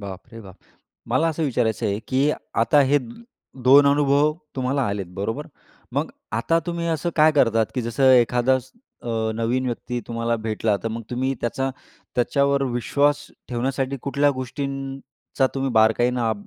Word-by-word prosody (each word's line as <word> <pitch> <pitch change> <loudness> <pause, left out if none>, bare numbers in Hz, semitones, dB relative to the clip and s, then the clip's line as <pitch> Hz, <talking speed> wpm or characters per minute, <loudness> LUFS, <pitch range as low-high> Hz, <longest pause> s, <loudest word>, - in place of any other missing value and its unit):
बापरे 100 +4 -9
बाप! 95 -4 -12 0.6
मला 130 +7 +2
असं 160 0 -2
विचारायचं 120 -6 0
आहे, 100 0 -1
की 135 +3 +2 0.3
आता 115 +6 +4
हे 140 +1 +4 0.7
2 140 +1 +8
अनुभव 145 +1 +3 0.2
तुम्हाला 130 +2 0
आलेत 100 -2 -3
बरोबर? 110 +9 -3 0.5
मग - - -1 0.3
आता 115 +9 +2
तुम्ही 170 -1 -2
असं 165 +1 -1
काय 155 0 +6
करतात, 115 -6 +3
की 125 - -1
जसं 130 +3 +3
एखादा 125 +1 +4 0.5
अ, - - -7 0.3
नवीन 120 +3 -1
व्यक्ती 120 0 -3
तुम्हाला 115 0 -1
भेटला 110 -1 0
तर 115 - -1
मग 115 +1 -5
तुम्ही 130 +2 -1
त्याचा 135 +3 -1 0.5
त्याच्यावर 140 +3 +2
विश्वास 140 +4 +2 0.3
ठेवण्यासाठी 130 +2 -2
कुठल्या 140 +1 +2
गोष्टींचा 135 +1 -4
तुम्ही 135 -1 -1
बारकाईनं 115 +1 +3
130 Hz, 140 wpm, -23 LUFS, 115-140 Hz, 0.7 s, 2